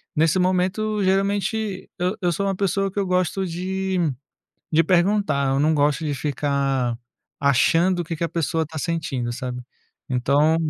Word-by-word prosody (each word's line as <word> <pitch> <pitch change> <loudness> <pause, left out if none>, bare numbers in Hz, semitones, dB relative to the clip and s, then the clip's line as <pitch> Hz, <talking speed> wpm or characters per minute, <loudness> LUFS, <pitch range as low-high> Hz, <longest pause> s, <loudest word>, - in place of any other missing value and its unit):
Nesse 160 +3 +3
momento, 185 +3 +1
geralmente, 195 +1 0
eu 180 +3 0
eu 175 -1 +2
sou 200 +5 -1
uma 195 - 0
pessoa 195 0 0
que 200 - -3
eu 195 - 0
gosto 185 +1 0
de 190 +2 -2 0.8
de 160 +1 +5
perguntar, 175 -5 +2
eu 135 +1 +1
não 155 +2 +3
gosto 145 +2 +1
de 150 - -1
ficar 135 -4 -1 0.5
achando 165 +7 +3
o - - -2
que 165 - -4
que 155 - -6
a 165 - 0
pessoa 165 0 -1
está 160 0 -6
sentindo, 145 -7 -2
sabe. 125 0 -5 0.5
Então 140 +5 +3
170 Hz, 165 wpm, -23 LUFS, 145-190 Hz, 0.8 s, de